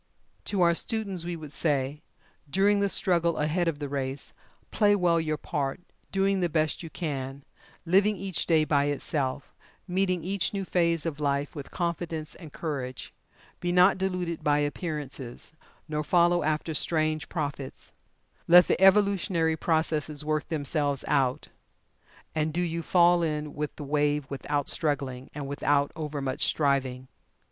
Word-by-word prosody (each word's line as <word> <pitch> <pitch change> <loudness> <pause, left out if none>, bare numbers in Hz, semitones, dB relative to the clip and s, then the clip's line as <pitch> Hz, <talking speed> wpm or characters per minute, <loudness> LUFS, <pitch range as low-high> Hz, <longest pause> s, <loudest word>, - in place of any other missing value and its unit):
To 200 -3 0
our 170 -1 +5
students, 195 -2 -1
we 175 0 -3
would 155 -3 -9
say: 145 -2 0 0.5
During 200 +5 +3
the 200 0 +2
struggle 170 -3 +2
ahead 160 +4 0
of 165 -3 0
the 145 -1 -4
race, 135 0 -4 0.4
play 205 -1 +4
well 175 -4 +2
your 155 -1 -1
part, 140 -4 -3 0.3
doing 195 0 +2
the 175 -1 +1
best 155 -1 0
you 165 - -7
can, 140 -5 -4 0.4
living 195 +5 +4
each 190 -7 -2
day 160 -2 +4
by 145 -2 +2
itself, 140 -1 -2 0.3
meeting 185 -2 0
each 195 +2 -1
new 195 -1 -2
phase 170 -3 +1
of 155 -3 -3
life 140 -1 -1
with 145 -2 -7
confidence 170 -2 -3
and 160 -4 -11
courage. 135 -6 -5 0.5
Be 175 - -1
not 180 +2 +5
deluded 180 -3 -2
by 145 -1 +3
appearances, 145 -4 -4 0.3
nor 150 -1 -2
follow 175 +2 +3
after 155 +1 -1
strange 155 0 +1
prophets. 145 -4 -4 0.6
Let 175 +1 +8
the - - +1
evolutionary 190 -4 +4
processes 155 -2 0
work 155 -1 -1
themselves 145 -2 -1
out, 135 -3 +1 0.8
and 155 0 0
do 175 +3 -1
you 170 -1 -2
fall 175 +1 +4
in 150 -2 -2
with 150 0 -4
the 150 - -7
wave 145 0 +1
without 145 +1 -2
struggling, 135 -5 -1
and 145 -2 -5
without 145 0 +1
overmuch 145 -4 -3
striving. 135 -3 +1
155 Hz, 150 wpm, -27 LUFS, 145-175 Hz, 0.8 s, Let